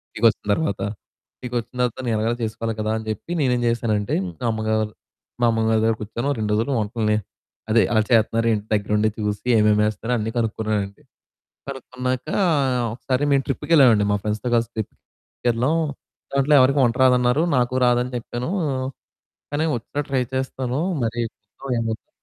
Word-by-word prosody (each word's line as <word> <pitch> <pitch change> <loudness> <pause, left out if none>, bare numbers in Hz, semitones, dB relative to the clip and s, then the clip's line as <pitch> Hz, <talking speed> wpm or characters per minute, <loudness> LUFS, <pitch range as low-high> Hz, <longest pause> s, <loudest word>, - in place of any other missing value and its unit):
ఇంటికొచ్చిన 110 -1 +2
తర్వాత 100 -10 -1 0.6
ఇంటికొచ్చిన 120 0 -5
తర్వాత 125 -2 0
నేను 115 - +1
ఎలాగైనా 115 +2 0
చేసుకోవాలి 115 +1 -2
కదా! 110 - -1
అని 110 - -8
చెప్పి 110 - -7
నేనేం 125 -3 +2
చేశానంటే 110 -3 0
మా 90 +6 -6
అమ్మగారు 110 0 0 0.6
మా - - +6
అమ్మగారి 110 0 +2
దగ్గర 115 0 +3
కూర్చొని 115 +5 -3
ఓ - - +2
2 105 -1 -1
రోజులు 115 +6 0
వంటల్ని 105 0 0 0.5
అదే 115 0 +5
అలా 110 - +4
చేతన్నారేంటి 115 0 +3
ఇంటి 105 - -16
దగ్గర 105 0 -2
ఉండి 110 +1 +3
చూసి, 105 +2 -3
ఏమేమి 105 0 +4
వేస్తారో 110 +2 -2
అన్నీ 110 +1 -2
కనుక్కున్నానండి. 105 -3 -2 0.7
కనుక్కున్నాక 130 0 -4 0.7
ఒకసారి 130 +3 -1
మేము 135 -1 +3
ట్రిప్‌కి 135 +4 -3
వెళ్ళామండి. 120 -9 +6
మా 105 - +2
ఫ్రెండ్స్‌తో 110 +3 -2
కలిసి 115 0 +1
ట్రిప్‌కెళ్లాం. 120 +5 -2 0.6
దాంట్లో 140 +2 +3
ఎవరికీ 135 +2 +4
వంట 120 -1 +2
రాదన్నారు 125 +3 +4
నాకు 125 0 +1
రాదని 125 +1 +2
చెప్పాను. 120 +2 -5 1.0
కానీ 145 +2 +1
వచ్చినట్టు 140 +5 -5
ట్రై 130 - +2
చేస్తాను 130 -1 -2 0.3
మరి 115 +1 -2 0.2
చూద్దాం 105 +6 -13
ఏమైద్దో. 115 -1 -4
115 Hz, 150 wpm, -22 LUFS, 110-125 Hz, 1.0 s, మా